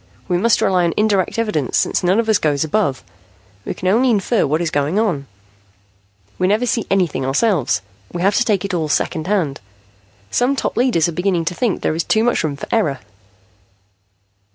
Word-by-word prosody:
We 175 -1 +1
must 230 +3 +2
rely 180 -2 +2
on 170 - -1
indirect 210 -1 +1
evidence, 210 - -1
since - - +1
none 185 +4 +3
of 230 - 0
us 215 -2 +3
goes 145 -2 +1
above. 160 -4 -1 0.6
We - - -4
can 185 - -4
only 235 +7 +3
infer 215 -3 +1
what 155 +3 0
is 170 -2 -2
going 145 +6 0
on. 175 -11 0 1.1
We 185 - +2
never 215 +5 +2
see 235 -2 -1
anything 180 -8 +1
ourselves. 135 - +1 0.3
We 175 - -4
have 200 +2 +3
to - - +3
take 205 -5 0
it 200 - -4
all 160 -3 -1
secondhand. 160 - -1 0.7
Some 255 +3 +1
top - - -2
leaders 240 -11 +2
are - - -2
beginning 180 0 -1
to 175 - -1
think 225 +2 -1
there's 160 +2 0
too 220 - +1
much 240 0 +1
room 150 -3 -2
for 140 - -8
error." 170 -12 +1
185 Hz, 185 wpm, -19 LUFS, 155-220 Hz, 1.1 s, none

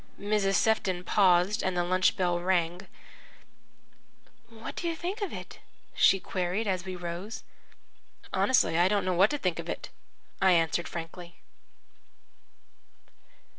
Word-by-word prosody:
Mrs. 200 -1 +1
Sefton 190 -5 +1
paused, 185 +2 +3
and 185 -1 -1
the 175 - +2
lunch 185 +2 +2
bell 175 -2 +1
rang. 175 +1 -1 1.6
"What 225 -1 -9
do 345 - -2
you 335 - -1
think 365 +7 -5
of 405 - -2
it?" - - -9 0.3
she 195 - +4
queried 185 +4 -2
as 185 -2 -2
we 185 -1 -5
rose. 175 +5 -6 0.9
"Honestly, 240 -10 +3
I 175 - +5
don't 205 0 +1
know 185 - +1
what 190 +4 +4
I 295 - -1
think 185 - -2
of - - -6
it," - - -5 0.5
I 190 -1 +5
answered 165 0 +1
frankly. 170 +1 -8
185 Hz, 135 wpm, -28 LUFS, 175-210 Hz, 1.6 s, I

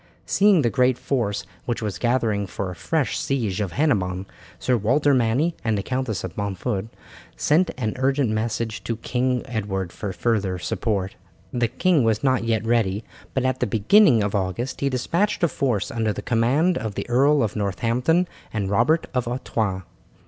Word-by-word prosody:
Seeing 195 -6 +4
the 120 - +2
great 125 -2 +3
force 105 -7 -1 0.2
which 120 -1 -2
was 100 -5 -3
gathering 115 -4 +1
for 95 0 -4
a - - -8
fresh 150 - -1
siege 110 -8 -1
of 95 -4 -3
Hennebon, 95 -11 0 0.3
Sir 125 - +1
Walter 130 +7 +2
Manny 130 +7 +2
and 110 -2 +1
the 100 - -2
Countess 125 -6 -2
of 90 -3 -6
Montford 100 +1 -3 0.5
sent 170 +5 +3
an 110 -4 -1
urgent 135 -2 +1
message 110 +1 -2
to 115 - -2
King 125 +1 -1
Edward 95 -6 -3
for 100 - -4
further 100 -3 0
support. 95 +1 -2 0.4
The 120 -1 +1
king 170 +3 +2
was 110 -1 +1
not 130 -3 +2
yet 115 -2 0
ready, 110 -3 +1 0.3
but 130 -1 +1
at 130 0 0
the - - +1
beginning 120 - +5
of 100 - -2
August 100 +6 -2
he 140 - +2
despatched 170 +11 0
a - - +6
force 125 - -1
under 110 -2 0
the - - -6
command 135 +10 +2
of 110 -3 -4
the - - -4
Earl 140 +4 +4
of 110 - -2
Northampton 120 - +1 0.2
and 100 -3 -2
Robert 120 +11 +3
of 125 -2 -1
Artois. 110 -6 -2
115 Hz, 175 wpm, -23 LUFS, 105-130 Hz, 0.5 s, a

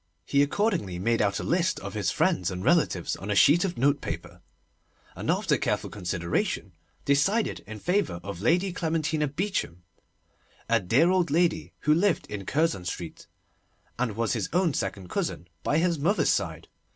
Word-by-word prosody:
He 140 - +3
accordingly 155 - 0
made 115 +6 +1
out 100 -1 +1
a - - -4
list - - +1
of - - -6
his - - 0
friends 90 -1 +1
and 90 0 -5
relatives - - +2
on 100 - -7
a 105 - +1
sheet 155 +11 +6
of 190 -3 -2
notepaper, 140 +3 -1 0.7
and - - -5
after - - +2
careful - - -1
consideration, 90 -3 -2 0.3
decided 195 +11 +2
in 110 0 -7
favour 180 - 0
of 100 -2 -6
Lady 175 - +2
Clementina 160 -3 0
Beauchamp, 155 - -2 0.9
a - - +3
dear 125 - +3
old 185 -2 +2
lady 170 +3 +1
who 150 - +4
lived 180 +3 +2
in 100 -2 -5
Curzon 150 - 0
Street, 85 -2 -6 0.7
and 115 -5 -1
was 115 -1 0
his 110 -6 -2
own 175 -3 +2
second 95 -7 -3
cousin 85 - -3
by 145 - +1
his 170 -1 +1
mother's 185 +9 +2
side. - - -2
140 Hz, 165 wpm, -27 LUFS, -, 0.9 s, sheet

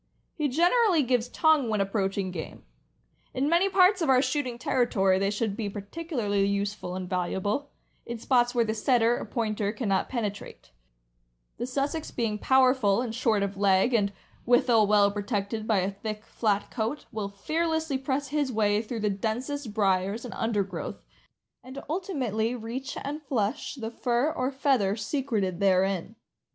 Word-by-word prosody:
He 300 -2 -1
generally 350 - +3
gives 245 -2 +1
tongue 315 -6 +3
when 215 -1 0
approaching 195 -1 -1
game. 165 -3 -7 0.7
In 265 +2 +1
many 345 +5 +3
parts 370 0 +4
of 320 - +1
our 260 -1 +6
shooting 255 -2 -1
territory 195 -7 +2
they 195 0 +1
should 205 0 -1
be 210 -2 -3
particularly 205 - -2
useful 200 -2 -2
and 185 -1 -4
valuable, 190 +9 -2 0.4
in 235 0 -4
spots 245 +1 +2
where 235 -1 +3
the 220 - -1
Setter 235 +1 +2
or - - -5
Pointer 215 -4 -1
can 225 +1 -4
not 190 -1 +1
penetrate; 210 - -5 0.9
the 240 - -3
Sussex 280 +4 -2
being 220 -3 -2
powerful 255 -6 +4
and 230 -3 -4
short 225 -4 +1
of 200 0 -3
leg, 195 +4 +3
and 205 -3 +2 0.3
withal 240 -3 +4
well 205 -1 +4
protected 205 +1 -3
by 210 -4 +3
a 190 +2 -1
thick, 210 +2 -6
flat 205 -3 -1
coat, 235 +5 -3
will 210 -2 -3
fearlessly 320 +6 -1
press 270 +1 -2
his 290 -2 0
way 210 -2 +2
through 225 0 -5
the 210 -1 +1
densest 230 +6 -3
briers 200 +2 0
and 245 - -6
undergrowth, 200 -5 -3 0.6
and 260 +2 -10
ultimately 255 - -1
reach 245 +3 -5
and 295 +2 -4
flush 260 -1 -2
the 225 -4 -5
fur 245 +5 0
or 255 -2 -1
feather 265 -7 +1
secreted 215 - -2
therein. 190 +1 +1
225 Hz, 160 wpm, -27 LUFS, 200-265 Hz, 0.9 s, our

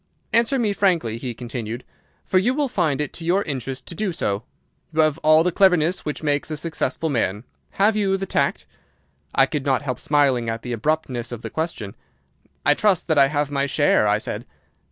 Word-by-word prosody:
"'Answer 235 +4 +3
me 220 -5 +1
frankly,' 170 - +1
he 120 -2 -5
continued, 120 0 -5 0.4
'for 185 - +3
you 245 +7 +1
will 290 -1 +1
find 160 - 0
it 150 -2 -2
to 170 - -7
your 180 +4 +2
interest 135 -2 -5
to - - -6
do 195 +3 -2
so. 105 - -2 0.5
You 160 0 +3
have 155 0 +2
all 155 +1 +5
the 180 - +1
cleverness 180 -2 +3
which 150 +1 -4
makes 145 0 0
a 155 - -3
successful 160 -1 -2
man. 110 -7 -1 0.3
Have 210 +2 +3
you 195 -2 +1
the 195 - -3
tact?' - - 0 0.7
"I 135 - +6
could 145 -1 -3
not 135 -1 +1
help 125 -3 -3
smiling 135 -6 +2
at 115 0 -4
the 125 - -4
abruptness 125 -1 -1
of 120 -2 -7
the - - -6
question. 160 - -4 0.7
"'I 145 - +6
trust 195 +2 +1
that 155 -2 +4
I 135 - +7
have 145 0 -1
my 140 0 0
share,' 140 -5 +3
I 105 0 +3
said. 110 - -5
150 Hz, 200 wpm, -22 LUFS, 125-180 Hz, 0.7 s, I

